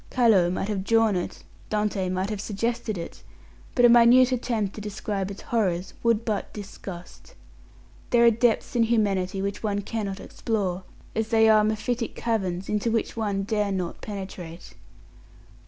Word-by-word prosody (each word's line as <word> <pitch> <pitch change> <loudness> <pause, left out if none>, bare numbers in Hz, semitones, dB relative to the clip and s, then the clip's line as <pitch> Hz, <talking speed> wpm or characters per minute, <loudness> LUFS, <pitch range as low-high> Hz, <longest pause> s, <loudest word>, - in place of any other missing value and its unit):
Callot 215 -9 +4
might 185 - -2
have 200 -3 -2
drawn 225 -1 +3
it, 180 - -4 0.3
Dante 210 -3 0
might 185 +3 -1
have 205 -2 -3
suggested 225 +1 -2
it, 170 - -7 0.5
but 245 - +5
a - - +8
minute 240 +2 +7
attempt 230 -5 -1
to 210 - -8
describe 200 -1 -3
its 200 - -8
horrors 190 -6 -1
would 230 -1 +2
but 210 -3 -2
disgust. 190 -3 -10 0.7
There 235 -1 +5
are 235 - +7
depths 230 +2 +1
in 240 - +3
humanity 195 -4 0
which 200 0 -3
one 205 -2 -1
cannot 200 -3 -4
explore, 190 -5 -3 0.3
as 220 0 0
there 220 -1 +5
are 215 - +5
mephitic 225 +2 -1
caverns 195 -5 -2
into 210 +2 0
which 225 -1 -1
one 205 -3 -1
dare 210 -1 0
not 180 -3 -3
penetrate. 190 -4 -8
210 Hz, 155 wpm, -25 LUFS, 195-230 Hz, 0.7 s, a